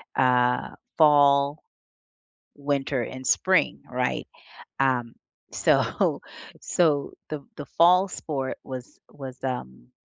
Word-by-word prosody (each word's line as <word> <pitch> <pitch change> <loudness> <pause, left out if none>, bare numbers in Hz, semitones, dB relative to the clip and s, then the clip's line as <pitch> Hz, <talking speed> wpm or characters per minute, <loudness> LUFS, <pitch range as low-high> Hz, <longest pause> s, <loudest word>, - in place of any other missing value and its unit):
uh, 125 -1 +2 0.2
fall, 145 -1 +4 0.9
winter 140 -2 -1
and 130 +2 -7
spring, 185 0 +2
right? 125 0 -2 0.5
Um, 125 -3 +1 0.4
so - - +1 0.4
so 150 -5 +1 0.2
the 150 -3 -6
the 145 - -6
fall 180 +3 +4
sport 135 -7 -4
was 130 -2 -9
was, 130 -2 -10
um 65 - -6
135 Hz, 95 wpm, -25 LUFS, 125-150 Hz, 0.9 s, fall